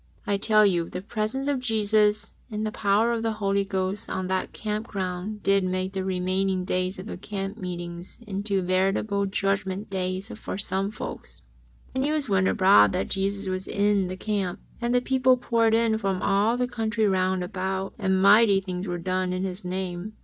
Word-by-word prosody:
I 200 - +1
tell 215 +1 +4
you 175 -4 +1
the 185 - -6
presence 220 +5 -2
of 285 -2 0
Jesus 215 -3 +1 0.2
in 215 -1 -3
the 215 - -1
power 210 +3 +2
of 230 -1 -1
the 225 -1 0
Holy 200 -2 0
Ghost 195 0 -2
on 185 - -2
that 190 0 -1
camp 215 +1 -3
ground 190 +2 -4
did 195 0 +3
make 185 +1 -1
the 190 -1 -2
remaining 185 0 0
days 185 +1 -1
of 185 - -7
the 220 - -7
camp 195 +1 -5
meeting 175 -1 -5 0.2
into 200 -1 -1
veritable 195 +2 +1
Judgment 195 +1 -1
Days 185 +2 -2
for 220 -4 -6
some 195 0 0
folks. 65 - -7 0.5
Then 260 - -1
the 280 - +1
news 305 -3 0
went 190 -3 +2
abroad 105 - +5
that 95 - -1
Jesus 195 0 -1
was 185 0 -3
in 200 -1 +2
the 185 +1 -5
camp, 195 -3 -2 0.2
and 240 +1 +1
the 245 - +4
people 255 0 +3
poured 230 -2 +2
in 225 -1 +2
from 195 -3 -1
all 210 +4 +2
the 250 0 0
country 225 -2 -1
round 185 -2 +1
about, 190 +1 -3
and 190 -2 +1
mighty 205 0 +7
things 185 0 -5
were 175 -1 -2
done 185 +1 -1
in 185 +1 -2
His 190 +1 -4
name. 185 +2 -4
195 Hz, 190 wpm, -26 LUFS, 185-215 Hz, 0.5 s, mighty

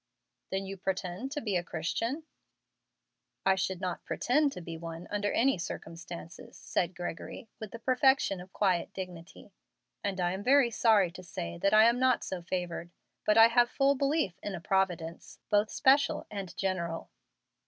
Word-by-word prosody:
"Then 195 0 -2
you 195 0 -6
pretend 190 +6 -3
to 295 - -3
be 210 -4 -1
a 175 - +1
Christian?" 230 - -2 1.2
"I 190 - +6
should 190 -1 -1
not 185 -2 -3
pretend 285 +4 +1
to - - -7
be 165 -1 -6
one 165 +1 -7
under 205 0 0
any 265 -4 +2
circumstances," 170 +1 -8
said 175 0 -1
Gregory, 175 +5 -6
with 215 - -6
the 230 - -8
perfection 255 -5 +2
of 180 +1 -12
quiet 185 -5 +1
dignity, 180 +1 -8 0.5
"and 195 -2 -2
I 175 -1 +1
am 190 +2 -4
very 265 -1 +5
sorry 215 -6 +4
to 185 - -10
say 85 - -6
that 200 +2 +3
I 215 - +8
am 235 +2 +4
not 255 -1 +3
so 185 -2 -4
favored. 175 -1 -3 0.4
But 210 +1 +4
I 225 +1 +9
have 240 0 +4
full 275 0 +3
belief 280 - 0
in 205 -2 -4
a - - -5
Providence, 175 -2 -1
both 210 +1 +3
special 275 +1 +3
and 195 -4 -6
general." 170 -4 -2
190 Hz, 170 wpm, -30 LUFS, 175-230 Hz, 1.2 s, I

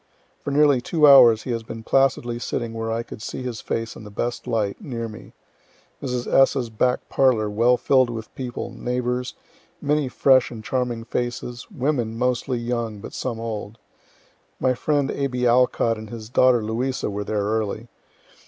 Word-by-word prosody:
For - - -5
nearly 140 -2 +4
two 155 +4 +2
hours 120 -6 +8
he 125 - -4
has 115 -1 -1
been 115 0 -8
placidly 125 -2 +1
sitting 115 0 -3
where 115 0 -3
I 115 +1 -1
could 110 - -10
see 130 - -5
his 120 -4 -5
face 115 0 -3
in - - -10
the 105 - -9
best 120 +4 -4
light, 105 -3 -1
near 115 -4 -4
me. 110 0 -11 0.7
Mrs. 125 -3 -2
S.'s 135 -3 +3
back 125 +3 0
parlor 115 -6 +2
well 120 +4 +3
fill'd 130 -2 +3
with 115 -2 -7
people, 125 -2 -5
neighbors, 125 0 -2 0.4
many 145 -1 +1
fresh 130 0 +4
and 110 -2 -9
charming 125 -2 -2
faces, 120 +1 -4
women, 125 -5 -1
mostly 125 +1 0
young, 120 -2 -3
but - - -9
some 120 -3 -3
old. 110 -1 -5 0.8
My 130 - +2
friend 145 +2 0
A. 140 - -1
B. 125 -1 -2
Alcott 120 -2 +3
and 110 -1 -9
his 110 -1 -8
daughter 125 -2 +4
Louisa 120 +2 -2
were 100 +1 -3
there 105 0 -1
early. 110 +1 -2
120 Hz, 170 wpm, -23 LUFS, 115-130 Hz, 0.8 s, hours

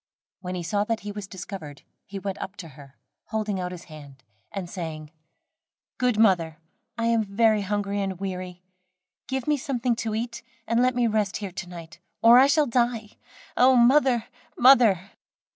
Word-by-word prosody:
When 185 -1 -5
he 175 - -4
saw 205 +5 0
that 225 0 -2
he 205 - -6
was 205 -2 -7
discovered, 180 -6 -9 0.2
he 200 - -7
went 195 0 -5
up 190 - -6
to 170 -5 -9
her, 140 -1 -16 0.3
holding 215 -3 -2
out 180 0 -3
his 175 -1 -9
hand, 145 -4 -13 0.3
and 195 -3 -5
saying: 160 -4 -7 0.9
"Good 250 -3 +1
mother, 175 -8 +3 0.4
I 230 - -1
am 230 -1 +2
very 215 +1 +2
hungry 200 0 -2
and 190 -2 -3
weary, 185 -2 -6 0.6
give 265 -1 -3
me 300 -1 +2
something 250 -4 -1
to 220 -2 -3
eat 235 +1 -4 0.2
and 230 +2 +1
let 250 0 +2
me 245 -1 +2
rest 215 -3 0
here 200 -3 -6
to 175 0 -7
night, 165 -2 -11 0.2
or 235 +2 +8
I 270 - +6
shall 300 +1 +3
die. 235 -3 0 0.5
Oh, 255 +1 +5
mother! 250 -1 +4 0.3
mother!" 230 -8 +5
205 Hz, 175 wpm, -25 LUFS, 180-235 Hz, 0.9 s, or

